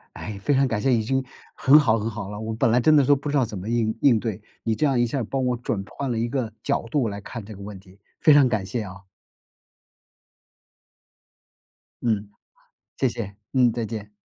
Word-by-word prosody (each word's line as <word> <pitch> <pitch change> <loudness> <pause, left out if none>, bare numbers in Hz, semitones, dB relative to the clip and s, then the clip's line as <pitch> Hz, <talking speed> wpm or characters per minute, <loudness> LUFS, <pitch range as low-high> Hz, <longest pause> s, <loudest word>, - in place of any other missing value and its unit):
哎， 105 -2 -6
非 145 - +2
常 135 0 +3
感 115 -4 -1
谢， 135 +4 +2
已 115 -2 +2
经 130 +4 0 0.3
很 145 +3 +6
好 115 -7 +3
很 110 +1 -2
好 105 -3 -6
了。 105 - -6
我 110 0 -4
本 115 +2 +2
来 120 +2 +4
真 155 +5 +5
的 145 - +5
都 145 +2 +5
不 140 +1 -5
知 145 - 0
道 135 - +4
怎 105 -4 -6
么 95 +4 -7
应 115 -2 0
应 125 -6 +5
对， 110 -2 -4 0.2
你 115 - +1
这 150 - +1
样 135 -3 +2
一 120 - +3
下 130 +4 -2
儿 125 - -1
帮 135 +4 -2
我 125 -1 +1
转 115 -4 -3
换 140 -2 -4
了 115 - -1
一 115 +1 0
个 120 -3 -2
角 - - 0
度 135 -5 +1
来 100 0 -5
看 115 +2 -8
这 110 +1 -10
个 100 - -12
问 100 -1 -8
题， 95 0 -19 0.2
非 155 - +6
常 145 -3 +6
感 110 -5 -1
谢 115 +4 -3
啊。 95 -1 -11 2.9
嗯， 105 -3 -1 0.7
谢 135 - +2
谢， 115 -5 -5 0.2
嗯， 125 -3 +4
再 115 0 -3
见。 105 -1 -7
115 Hz, 245 characters per minute, -24 LUFS, 105-130 Hz, 2.9 s, 很